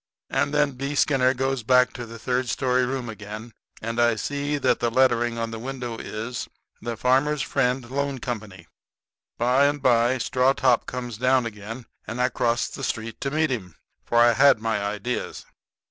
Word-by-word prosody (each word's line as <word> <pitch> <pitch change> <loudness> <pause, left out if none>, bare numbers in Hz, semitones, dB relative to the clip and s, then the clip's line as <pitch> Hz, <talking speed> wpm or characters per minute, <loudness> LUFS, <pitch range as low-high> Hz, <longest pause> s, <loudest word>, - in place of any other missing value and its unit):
And - - +1
then 150 -1 +2
B. 140 +2 -4
Skinner 135 -2 +3
goes 130 0 -1
back 125 +2 +4
up - - -25
to 120 -1 -7
the 115 +1 -9
third 125 +2 -1
story 125 0 +1
room 130 -1 -3
again, 110 +1 -8 0.3
and 115 +1 -3
I 120 -1 +4
see 145 +5 -2
that 140 - +2
the 120 - +1
lettering 120 -1 +2
on 115 0 -2
the 115 - -5
window 125 -2 -5
is 115 +3 -5 0.3
"The 120 -1 -4
Farmers' 135 +5 +2
Friend 125 -3 0
Loan 140 +1 -2
Company." 105 -7 -6 0.7
By 125 +4 +4
and 145 0 -1
by 120 0 +3
Straw 130 +1 +2
top 130 -3 +2
comes 120 -3 -5
down 130 0 +3
again, 115 +2 -7 0.2
and 120 +2 -5
I 125 +1 +3
crossed 120 -2 0
the 135 - -7
street 115 -2 -4
to 140 - -1
meet 155 0 +1
him, 95 -10 -4 0.3
for 120 - -1
I 120 0 +6
had 140 +2 +6
my 110 -2 -1
ideas. 105 +4 -3
125 Hz, 185 wpm, -24 LUFS, 115-135 Hz, 0.7 s, I